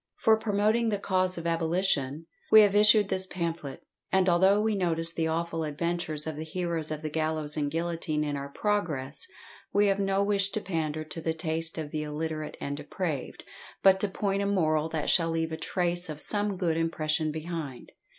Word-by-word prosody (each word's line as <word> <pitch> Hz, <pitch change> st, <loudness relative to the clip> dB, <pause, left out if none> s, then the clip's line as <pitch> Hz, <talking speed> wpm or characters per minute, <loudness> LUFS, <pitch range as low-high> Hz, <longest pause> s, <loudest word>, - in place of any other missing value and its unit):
For 220 Hz, -, +4 dB
promoting 220 Hz, +2 st, +1 dB
the 205 Hz, -, 0 dB
cause 185 Hz, -2 st, 0 dB
of 170 Hz, -, -6 dB
abolition, 165 Hz, -3 st, 0 dB, 0.3 s
we 220 Hz, -, +10 dB
have 205 Hz, -2 st, +4 dB
issued 210 Hz, 0 st, +6 dB
this 190 Hz, 0 st, +3 dB
pamphlet, 165 Hz, -7 st, -4 dB, 0.3 s
and 190 Hz, -1 st, +3 dB
although 190 Hz, +3 st, +4 dB
we 220 Hz, +1 st, +1 dB
notice 165 Hz, -4 st, 0 dB
the 165 Hz, -1 st, 0 dB
awful 165 Hz, 0 st, -2 dB
adventures 155 Hz, 0 st, -1 dB
of 160 Hz, -2 st, -4 dB
the 155 Hz, -, -4 dB
heroes 165 Hz, -1 st, -2 dB
of 155 Hz, 0 st, -5 dB
the 155 Hz, -, -2 dB
gallows 155 Hz, -1 st, -1 dB
and 145 Hz, -2 st, -1 dB
guillotine 165 Hz, -1 st, -1 dB
in 145 Hz, -1 st, -2 dB
our 140 Hz, 0 st, -5 dB
progress, 150 Hz, -8 st, -1 dB, 0.4 s
we 205 Hz, +1 st, +3 dB
have 195 Hz, 0 st, +2 dB
no 195 Hz, 0 st, +1 dB
wish 200 Hz, -1 st, +1 dB
to -, -, 0 dB
pander 160 Hz, -5 st, -2 dB
to 160 Hz, +1 st, -8 dB
the 160 Hz, 0 st, -1 dB
taste 165 Hz, 0 st, -1 dB
of 155 Hz, -2 st, -5 dB
the 155 Hz, -, -2 dB
illiterate 155 Hz, +1 st, -4 dB
and 140 Hz, 0 st, -4 dB
depraved, 150 Hz, -1 st, -4 dB, 0.4 s
but 190 Hz, -1 st, +6 dB
to 205 Hz, -, +1 dB
point 195 Hz, 0 st, -1 dB
a 200 Hz, -, 0 dB
moral 160 Hz, -5 st, +1 dB
that 160 Hz, -2 st, -3 dB
shall 165 Hz, -2 st, +3 dB
leave 165 Hz, 0 st, -1 dB
a -, -, -2 dB
trace 175 Hz, 0 st, -1 dB
of 150 Hz, -1 st, -6 dB
some 205 Hz, 0 st, 0 dB
good 170 Hz, -3 st, 0 dB
impression 155 Hz, -1 st, 0 dB
behind. 155 Hz, -4 st, -6 dB
165 Hz, 190 wpm, -28 LUFS, 155-195 Hz, 0.4 s, we